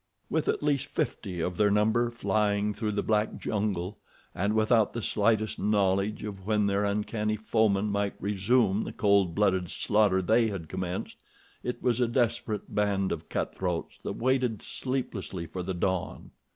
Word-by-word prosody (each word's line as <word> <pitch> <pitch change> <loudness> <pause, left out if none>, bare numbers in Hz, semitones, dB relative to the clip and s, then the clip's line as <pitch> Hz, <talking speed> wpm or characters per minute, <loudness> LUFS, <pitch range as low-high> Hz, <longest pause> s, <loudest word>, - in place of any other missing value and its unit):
With - - 0
at - - 0
least 145 -2 +1
fifty 90 -5 -3
of 90 +1 -2
their 105 -1 +4
number 110 +3 +2
flying 105 -2 0
through 105 0 -2
the 105 - -1
black 105 0 +1
jungle, 100 -2 -2 0.3
and 100 +4 0
without 110 0 +3
the 115 - -3
slightest 110 0 +1
knowledge 100 0 +1
of 100 -2 -7
when 105 -1 +2
their 100 +1 +1
uncanny 105 +1 -1
foemen 110 -2 +1
might 100 0 -1
resume 105 +1 +2
the - - -6
cold 100 -4 +3
blooded 95 -4 +2
slaughter 105 -3 +2
they 110 +5 +3
had 95 -7 -5
commenced, 95 0 -4 0.4
it 125 -1 -4
was 125 -1 +2
a 120 - +3
desperate 115 -3 -1
band 100 -2 +1
of 80 0 -5
cut - - -2
throats 90 -3 -3
that - - -4
waited 125 -3 +1
sleeplessly 115 -9 -4
for 90 +3 -5
the 95 +1 -3
dawn. 90 0 -2
105 Hz, 165 wpm, -28 LUFS, 95-110 Hz, 0.4 s, their